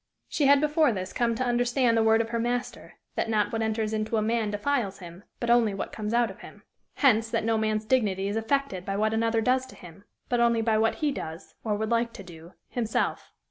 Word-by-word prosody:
She 285 - +1
had 280 0 +6
before 300 -1 +3
this 185 -3 -5
come 235 -1 +1
to 255 - -1
understand 245 0 +2
the 225 - +3
word 220 0 +4
of 225 - -4
her 230 0 -2
Master, 240 +1 -3 0.2
that - - -2
not 215 -2 +1
what 225 - -1
enters 220 0 -1
into 215 +1 -1
a - - +2
man 225 -1 0
defiles 210 -1 -1
him, 175 +1 -11 0.2
but 235 -1 0
only 230 -4 +3
what 195 - -5
comes 210 -1 -4
out 235 -2 +2
of 190 - -14
him; - - -13 0.3
hence, 225 -5 +3
that - - -1
no 225 0 +1
man's 215 0 0
dignity 205 -6 +1
is 205 - -2
affected 225 -4 -1
by 195 +1 -3
what 215 +1 +1
another 225 0 +1
does 255 +2 +1
to - - -14
him, 175 +3 -14 0.2
but 245 - 0
only 235 -1 +3
by 220 -1 +2
what 225 0 +2
he 300 -2 0
does, 165 -8 -7
or 215 -2 0
would 220 +2 -3
like 235 0 +1
to 195 - -9
do, 170 -1 -13 0.2
himself. 225 -3 -2
225 Hz, 235 wpm, -27 LUFS, 210-240 Hz, 0.3 s, had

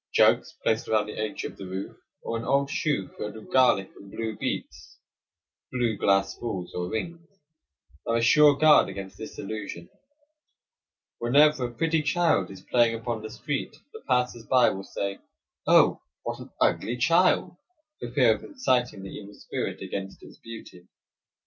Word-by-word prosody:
Jugs - - +4
placed 110 0 +1
around 110 -1 +2
the 105 - -8
edge 110 -1 -3
of - - -7
the 95 - -8
roof, 95 +1 -6 0.3
or 115 - -3
an 115 - -3
old 140 +3 +1
shoe 145 - -1
filled 105 0 -7
with 110 - -12
garlic 125 -7 +4
and 100 - -14
blue 110 +1 -4
beets - - -5 0.7
(blue 120 -3 0
glass 95 -1 +2
balls 95 -7 -5
or 90 0 -3
rings) 165 +8 -5 0.8
are 115 - +1
a 115 - +2
sure 145 +5 +6
guard 155 0 +6
against 95 -1 -7
this 110 - -8
illusion. 100 -5 -6 1.3
Whenever 140 +3 +4
a - - -10
pretty 160 +4 +1
child 155 - +2
is 95 -1 -11
playing 120 -2 +3
upon 115 0 -4
the 110 - -7
street 125 +6 -4 0.2
the 445 - -10
passers 125 -3 0
by 130 -2 +5
will 95 - -6
say: 100 0 -4 0.5
"Oh, - - +5 0.2
what - - -4
an - - -10
ugly 120 +2 +1
child!" 170 +6 +3 0.4
for - - -5
fear - - +4
of - - -8
inciting 125 - -1
the 95 - -8
evil 105 0 -10
spirit - - -5
against 95 0 -6
its - - -14
beauty. 110 -6 -11
115 Hz, 165 wpm, -26 LUFS, 100-140 Hz, 1.3 s, sure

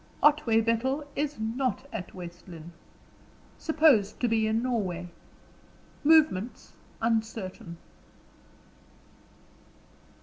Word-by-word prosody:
"Otway 270 -7 +5
Bethel 255 +6 0
is 295 -3 -2
not 240 +2 -2
at 180 - -6
West 175 0 -9
Lynne. 170 -1 -10 0.9
Supposed 300 - +3
to 245 - +1
be 220 -1 +2
in 220 +2 0
Norway. 185 -8 -2 0.9
Movements 290 -9 +3 0.3
uncertain." 220 -6 -2
225 Hz, 80 wpm, -28 LUFS, 190-265 Hz, 0.9 s, Otway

